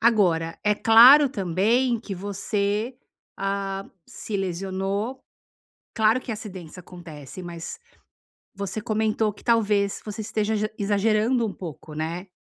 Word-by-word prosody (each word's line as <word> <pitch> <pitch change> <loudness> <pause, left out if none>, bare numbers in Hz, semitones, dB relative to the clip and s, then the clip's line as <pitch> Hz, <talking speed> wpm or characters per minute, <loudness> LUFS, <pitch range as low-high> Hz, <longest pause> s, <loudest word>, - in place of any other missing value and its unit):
Agora, 180 -8 +2
é 210 0 +3
claro 245 +7 +8
também 225 +4 +1
que 205 -3 -6
você, 205 +4 -2 0.4
ah, 195 0 -2 0.2
se 210 - -5
lesionou 195 +6 -3 0.7
claro 220 +3 +3
que 250 - -5
acidentes 190 -7 -8
acontece, 170 -4 -10
mas 170 - -7 0.8
você 200 +1 -4
comentou 215 -1 0
que - - -18
talvez 210 -4 +2
você 215 +1 -6
esteja 215 0 -1
ja 215 0 -1
exagerando 215 +4 +2
um 210 - -4
pouco, 160 -4 -9
né 165 +5 -4
205 Hz, 120 wpm, -24 LUFS, 185-220 Hz, 0.8 s, claro